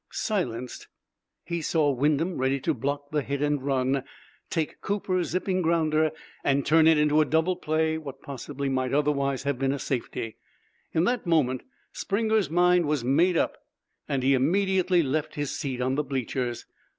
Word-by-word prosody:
Silenced, 125 - -3 0.6
he 170 -1 -3
saw 155 -2 +2
Wyndham, 150 +6 0
ready 135 +1 +1
to - - +1
block 145 +3 -3
the 150 -1 +1
hit 140 0 -3
and 145 -1 +1
run, 135 0 0 0.5
take 160 -2 -2
Cooper's 185 -4 -1
zipping 185 +1 0
grounder 160 -2 +2 0.3
and 140 0 +1
turn 160 +1 +5
into 150 -1 +4
a - - +3
double 160 +5 +1
play 160 -1 0
what 140 -3 -9
possibly 140 0 -5
might 130 -1 0
otherwise 140 -2 +1
have 140 -2 -1
been 135 0 +1
a 140 - -1
safety. 120 -4 -4 0.5
In 160 - +2
that 240 -2 0
moment 135 -6 +2 0.3
Springer's 220 -1 0
mind 175 0 +3
was 150 -4 0
made 165 +8 +3
up, - - 0 0.5
and 135 -2 0
he 135 +1 +4
immediately 185 +5 +2
left 155 +3 -2
his 145 -2 -2
seat 130 -3 -4
on 130 +1 0
the 150 +2 0
bleachers. 130 -3 -3
150 Hz, 165 wpm, -26 LUFS, 135-165 Hz, 0.6 s, turn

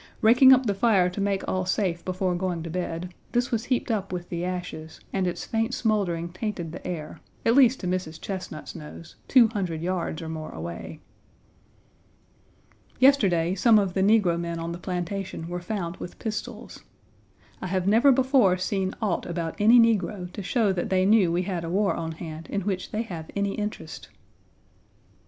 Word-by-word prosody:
Raking 250 +4 +7
up 260 0 +6
the 205 - +1
fire 195 -3 +3
to 200 - -4
make 195 -1 -1
all 185 0 0
safe 180 -3 0
before 185 0 -1
going 175 -2 -2
to 165 - -6
bed, 175 0 -4 0.2
this 245 0 +1
was 230 0 -1
heaped 250 -2 0
up 200 -3 -2
with 175 -1 -5
the 170 0 -3
ashes, 180 -3 -5
and 190 -2 +1
its 175 - -3
faint 225 +2 -1
smoldering 185 -7 0
tainted 185 -3 -4
the 170 - -9
air, 165 -4 -5 0.3
at 230 - +4
least 255 -1 +5
to 180 - -3
Mrs. 180 -3 -3
Chesnut's 185 -5 -6
nose, 155 +2 -10
two 245 -4 +6
hundred 180 -7 -3
yards 175 -3 -2
or - - -6
more 160 -1 -5
away. 85 +1 -7 2.0
Yesterday 195 -11 +4
some 220 +4 +5
of 195 -3 +1
the 190 - 0
negro 195 -4 +3
men 170 -1 -3
on 165 0 -4
the 170 - -6
plantation 180 -1 -4
were 175 +1 -4
found 175 -2 -4
with 175 - -8
pistols. 215 -2 -6 0.8
I - - -3
have 185 0 -1
never 230 +7 +6
before 255 -7 +4
seen 190 0 -2
aught 195 -5 -1
about 170 -2 -3
any 225 +4 +7
negro 205 -5 +1
to - - -5
show 205 +1 +1
that 175 - -2
they 185 0 +2
knew 200 -4 +4
we 175 +2 +1
had 180 -3 -3
a 165 - -4
war 195 +3 +2
on 165 -1 -4
hand 160 0 -8
in 200 - -1
which 190 -1 -3
they 215 +2 -2
have 170 -7 -8
any 200 -1 0
interest. 210 0 -6
185 Hz, 185 wpm, -26 LUFS, 170-215 Hz, 2.0 s, Raking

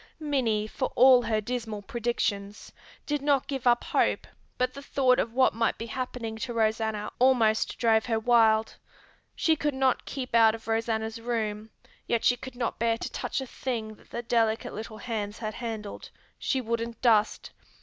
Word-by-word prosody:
Minnie, 255 -9 0
for 260 +4 -3
all 255 0 +7
her 225 -2 0
dismal 220 -2 -4
predictions, 215 -4 -3 0.3
did 295 -1 -1
not 280 -2 +2
give 270 -3 -3
up 240 0 +4
hope - - +1 0.3
but 255 0 0
the 280 - -8
thought 260 -2 +2
of 225 - 0
what 260 0 +4
might 230 0 0
be 230 - -5
happening 235 -1 -5
to 240 +2 -4
Rosanna 220 -1 0
almost 240 -4 +3
drove 225 0 +2
her 225 -2 +1
wild. 220 -2 +3 0.6
She 320 - +2
could 295 -2 -1
not 265 -2 +1
keep 260 -3 -6
out 225 -1 +6
of 225 - -13
Rosanna's 225 0 -1
room, 220 -2 -3 0.4
yet 235 -1 0
she 245 - +5
could 260 +1 -10
not 240 -2 -3
bear 230 0 +1
to - - -5
touch - - -3
a - - -4
thing 235 -4 -4
that - - -21
the 235 - -5
delicate 225 -2 0
little 220 +1 -7
hands 215 -2 -4
had 215 -2 -4
handled. 220 -3 -6 0.3
She 265 - 0
wouldn't 230 -1 -3
dust. 220 -3 +2
230 Hz, 175 wpm, -27 LUFS, 220-250 Hz, 0.6 s, all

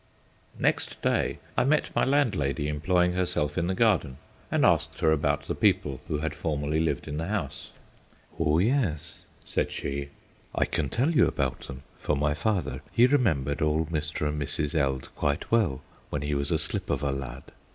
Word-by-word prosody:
Next - - 0
day - - +1 0.2
I - - +3
met 150 +4 +1
my - - +3
landlady 95 - +1
employing 90 +4 +2
herself 90 -5 0
in 85 - 0
the 95 - 0
garden, 95 - +2 0.3
and - - +3
asked - - +2
her 80 - +4
about 70 -1 +1
the - - -3
people 70 -4 +1
who 75 - -1
had 80 +2 -2
formerly 75 -1 -1
lived 80 0 -1
in 75 - -4
the 80 +1 -2
house. 80 -9 -3 0.7
"Oh 80 -1 +3
yes," 100 - 0 0.2
said - - -1
she. 70 0 -4 0.5
"I - - +3
can 70 - -1
tell 130 - +1
you 160 - +5
about - - -2
them, 65 0 -8 0.2
for - - 0
my 75 +1 +1
father 90 +1 -1
he 120 - +5
remembered 85 - +2
old 75 +1 +1
Mr. 75 -1 -1
and 75 0 -2
Mrs. 75 +1 -2
Eld 70 -4 0
quite 70 0 -1
well 105 - +2 0.3
when 75 -1 -3
he 75 0 -1
was 70 0 0
a 80 - +2
slip 80 0 -3
of 70 - 0
a 70 - +1
lad. 70 -1 -5
75 Hz, 185 wpm, -27 LUFS, 70-90 Hz, 0.7 s, you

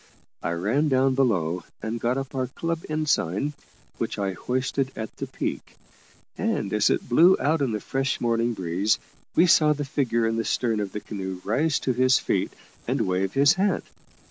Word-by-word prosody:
I 85 - -1
ran 110 - +1
down 135 0 +3
below 90 -10 +1 0.2
and 115 +2 -3
got 120 +3 0
up 135 -1 -4
our 130 -1 -1
club 165 +5 -3
ensign, 150 - 0 0.5
which - - -2
I 100 -1 -1
hoisted 130 +5 -1
at 110 -1 -6
the - - -4
peak, - - -5 0.6
and 100 - -1
as 105 0 +3
it - - 0
blew 170 +10 +6
out 155 +1 +1
in 135 -4 +1
the 105 - -2
fresh 135 +4 -1
morning 115 0 +1
breeze, 95 +4 +1 0.4
we 170 - +6
saw 155 -3 +5
the 145 0 -4
figure 120 -4 0
in 115 0 0
the 115 - 0
stern 115 -1 0
of 100 -2 -3
the 105 - -4
canoe 95 -3 -5
rise 145 +9 +1
to 130 - 0
his 130 +1 +4
feet - - -1 0.4
and - - 0
wave 95 +1 0
his 140 +1 +5
hat. 195 +1 0
120 Hz, 185 wpm, -25 LUFS, 105-140 Hz, 0.6 s, blew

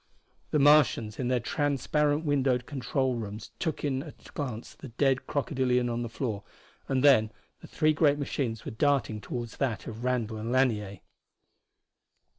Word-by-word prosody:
The - - +1
Martians 145 -7 +4
in 125 - -1
their 125 0 +2
transparent 145 +4 0
windowed 135 -4 +1
control 130 -1 -1
rooms 105 0 -6
took 160 -4 -2
in 135 -2 0
at 150 0 -12
a - - -15
glance 125 -6 -5
the - - -11
dead 130 +2 0
crocodilian 130 -4 0
on 120 0 -2
the 120 - -3
floor, 110 -3 -3 0.5
and 130 -1 0
then 110 -7 +5 0.3
the - - -12
three 155 0 +2
great 145 -2 +3
machines 130 -6 -3
were - - -4
darting 115 -3 +1
toward 120 +3 -5
that 120 -1 -2
of 115 +1 -7
Randall 120 -3 -1
and 110 +2 -4
Lanier. 105 -7 +1
130 Hz, 160 wpm, -28 LUFS, 115-145 Hz, 0.5 s, then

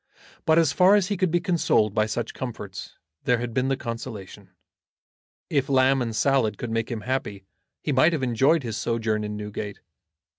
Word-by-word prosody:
But 160 0 +5
as 165 -4 +4
far 190 +2 +6
as 200 -2 +2
he 205 - 0
could 185 -1 +1
be 175 +2 +2
consoled 170 - +1
by 110 +1 +2
such 115 +1 -3
comforts, 110 -7 -7 0.3
there 125 - +3
had 120 0 -4
been 130 +2 +1
the 135 -1 0
consolation. 115 -5 -7 1.0
If 140 -3 0
lamb 135 0 +4
and 115 -2 -2
salad 125 -6 +2
could 120 - -5
make 115 0 -1
him 115 -3 -4
happy 105 -6 -3 0.4
he 150 - -1
might 140 +5 +4
have 150 -5 -1
enjoyed 135 +6 +3
his 115 -2 -4
sojourn 110 -2 -1
in 105 0 -4
Newgate. 105 0 -6
125 Hz, 185 wpm, -25 LUFS, 110-140 Hz, 1.0 s, far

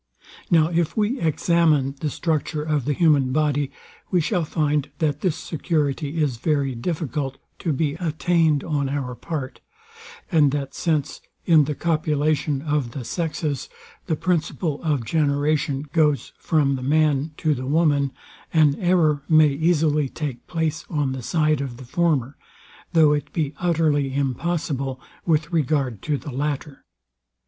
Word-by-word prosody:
Now 160 -2 +4
if 170 +1 0
we 220 +5 +1
examine 160 -3 +2
the 150 - -1
structure 155 -1 -1
of 150 -4 -1
the 145 - +1
human 145 -5 +3
body, 145 -1 +1 0.4
we 180 - +2
shall 175 +2 0
find, 150 -2 0
that 150 -3 -1
this 180 -5 +1
security 155 -2 -2
is 140 -6 0
very 140 0 0
difficult 135 0 -3 0.2
to 165 - -1
be 145 0 0
attained 160 -2 +1
on 145 -4 -1
our 135 -3 -3
part; 135 0 -5 0.7
and 150 -5 +4
that 140 -2 -3
since, 155 -4 -1 0.2
in 160 -4 +5
the 150 +1 -3
copulation 150 -3 0
of 145 -6 -1
the 130 -4 -6
sexes, 155 -3 -3 0.4
the 160 - +1
principle 160 -2 -1
of 145 -8 0
generation 145 -1 +1
goes 150 -4 +2
from 140 -4 +1
the - - -6
man 150 +1 +2
to 155 -2 +1
the 130 -1 -5
woman, 145 -2 +2 0.4
an 155 -3 +4
error 170 -5 +3
may 155 -2 +6
easily 150 -1 +1
take 145 -5 -5
place 160 -2 -2
on 145 -4 0
the 130 -1 -4
side 155 +2 +1
of 130 -4 -5
the 130 - -10
former, 145 -2 0 0.6
though 155 -3 +6
it 145 0 -3
be 150 -3 -1
utterly 155 -6 +1
impossible 140 -1 -2 0.3
with 160 +1 +1
regard 140 - 0
to 150 -2 -1
the 145 - -8
latter. 145 +1 -4
150 Hz, 145 wpm, -23 LUFS, 140-160 Hz, 0.7 s, may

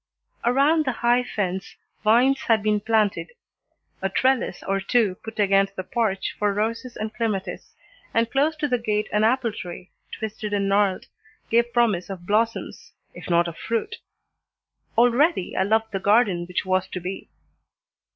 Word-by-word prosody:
Around 280 +6 +3
the 260 - 0
high 245 +1 +4
fence 190 -5 -3 0.3
vines 250 +5 +4
had 220 -3 +3
been 210 -1 +2
planted, 220 - 0 0.7
a - - 0
trellis 260 -1 0
or 195 0 0
two 210 0 +2
put 220 0 -8
against 195 -1 +3
the 185 - -4
porch 215 -4 -1
for 205 -1 +1
roses 230 +3 -2
and 215 0 -4
clematis, 215 -4 -3 0.4
and 230 0 +2
close 295 +4 +2
to 300 -1 -1
the 250 -3 0
gate 215 -2 -1
an 210 0 +2
apple 235 +1 +2
tree, 180 -1 -8 0.2
twisted 215 -1 -5
and 200 -1 +1
gnarled, 195 -1 +1 0.5
gave 235 +1 +3
promise 220 -8 +1
of 185 -3 -7
blossoms, 225 +4 -1 0.2
if - - -10
not 170 0 +3
of 165 -1 -7
fruit. 230 - -2 1.0
Already 245 - +3
I - - +1
loved 220 +3 +1
the 195 - -2
garden 200 -3 +3
which 180 +1 -2
was 185 0 +1
to 185 - -5
be. 185 +2 -6
215 Hz, 160 wpm, -24 LUFS, 195-240 Hz, 1.0 s, high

